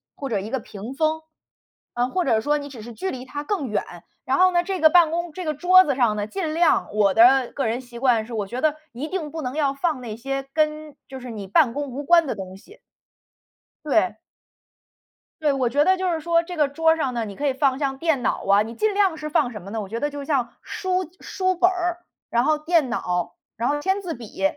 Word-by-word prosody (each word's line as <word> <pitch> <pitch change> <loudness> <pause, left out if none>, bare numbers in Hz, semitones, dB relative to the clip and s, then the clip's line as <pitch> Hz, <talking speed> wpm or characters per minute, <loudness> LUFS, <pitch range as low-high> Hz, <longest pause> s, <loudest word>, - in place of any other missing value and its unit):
或 275 - -5
者 215 -4 0
一 205 +3 -7
个 265 - 0
屏 215 +2 -8
风， 315 +2 0 0.7
啊， 245 +1 0
或 360 +6 -1
者 220 -1 +2
说 295 +5 +1
你 285 -1 -7
只 250 -5 -10
是 235 +3 -9
距 375 +12 -4
离 255 -1 -6
它 290 +3 -6
更 310 -5 -2
远。 210 - 0 0.4
然 265 +1 +1
后 370 0 +6
呢， 350 -1 +2
这 380 +1 -3
个 315 -1 +7
办 335 -1 +5
公 345 0 -2
这 365 +3 -7
个 310 - 0
桌 365 +5 +6
子 285 - +1
上 240 -5 +2
呢， 205 -1 -2
尽 315 - -3
量 335 -1 +3
我 200 -2 +3
的 245 +3 +5
个 270 -4 -1
人 235 +3 -2
习 245 -2 -11
惯 240 -4 +2
是 235 - -10
我 210 -3 -2
觉 245 +5 -5
得 310 -1 +1 0.2
一 265 +6 -5
定 320 -3 -4
不 320 +1 -6
能 250 0 -3
要 280 -3 +1
放 300 -2 -1
那 225 -3 -6
些 270 +2 -4
跟 305 -1 -1
就 265 -1 -8
是 250 -1 -9
你 215 -4 -6
办 245 - +3
公 285 -2 -3
无 275 +4 -5
关 335 +3 +5
的 270 - -2
东 190 -3 -8
西。 415 - -18 1.1
对。 325 +4 +1 1.2
对， 295 -2 +2
我 260 -3 0
觉 290 +5 +2
得 375 +1 +5
就 370 -1 -1
是 330 - -1
说 335 +1 +2
这 355 0 -8
个 300 -2 +3
桌 320 +3 +2
上 270 -5 -1
呢， 235 -1 -1
你 205 -2 -6
可 285 +8 -2
以 270 - +1
放 265 -1 +1
像 270 -2 -1
电 315 -3 +1
脑 - - -1
啊 200 +1 +5
你 225 +2 -5
尽 430 - +1
量 395 -4 +2
是 305 -1 -6
放 250 -4 +1
什 210 -4 -8
么 195 +3 -10
呢 225 - -3
我 205 - -5
觉 225 +4 -4
得 290 - 0
就 285 -1 -7
像， 260 -5 0
书 370 -3 -2
书 370 -1 -1
本 360 +1 +4
儿， 355 -1 -2 0.3
然 235 +1 +2
后 305 +2 +2
电 315 -3 +2
脑， 180 -7 -2 0.2
然 235 +3 -1
后 290 - 0
签 380 +3 0
字 355 -4 -4
笔、 230 -6 -9
285 Hz, 265 characters per minute, -23 LUFS, 240-330 Hz, 1.2 s, 个